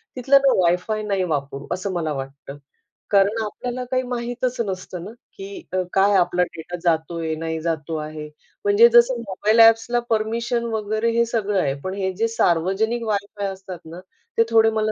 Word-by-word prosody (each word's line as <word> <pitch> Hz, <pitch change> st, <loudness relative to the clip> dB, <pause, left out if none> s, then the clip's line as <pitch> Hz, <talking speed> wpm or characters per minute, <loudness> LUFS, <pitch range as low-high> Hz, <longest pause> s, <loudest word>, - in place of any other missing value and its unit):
तिथलं 265 Hz, +2 st, +4 dB
ना -, -, +5 dB
वायफाय 180 Hz, +5 st, +1 dB
नाही 195 Hz, -3 st, 0 dB
वापरू, 140 Hz, -3 st, -3 dB
असं 190 Hz, +1 st, -3 dB
मला 160 Hz, -4 st, -2 dB
वाटतं. 140 Hz, +1 st, -8 dB, 0.5 s
कारण 200 Hz, +3 st, +3 dB
आपल्याला 245 Hz, +4 st, -5 dB
काही 255 Hz, 0 st, +2 dB
माहीतच 245 Hz, 0 st, -3 dB
नसतं 185 Hz, -2 st, -6 dB
ना, 205 Hz, -, -8 dB, 0.3 s
की 390 Hz, -2 st, -8 dB
अ, 185 Hz, -, +1 dB
काय 200 Hz, +1 st, +4 dB
आपला 175 Hz, 0 st, +2 dB
डेटा 170 Hz, 0 st, -7 dB
जातोय, 165 Hz, -1 st, 0 dB
नाही 160 Hz, 0 st, -3 dB
जातो 160 Hz, -1 st, -3 dB
आहे. 155 Hz, 0 st, -6 dB, 0.4 s
म्हणजे 205 Hz, +4 st, +6 dB
जसं 240 Hz, +1 st, +5 dB
मोबाईल 215 Hz, +2 st, 0 dB
ॲप्सला 225 Hz, +1 st, +5 dB
परमिशन 230 Hz, +2 st, 0 dB
वगैरे 220 Hz, +2 st, 0 dB
हे 235 Hz, -, +4 dB
सगळं 210 Hz, -4 st, -1 dB
आहे. 135 Hz, -2 st, 0 dB
पण 185 Hz, -, -3 dB
हे 190 Hz, -1 st, -2 dB
जे 225 Hz, +4 st, +1 dB
सार्वजनिक 220 Hz, +3 st, +1 dB
वायफाय 205 Hz, -1 st, -2 dB
असतात 190 Hz, -2 st, -9 dB
ना, 165 Hz, +3 st, -9 dB, 0.4 s
ते 230 Hz, -, +6 dB
थोडे 225 Hz, -1 st, +5 dB
मला 215 Hz, 0 st, 0 dB
200 Hz, 170 wpm, -22 LUFS, 170-230 Hz, 0.5 s, म्हणजे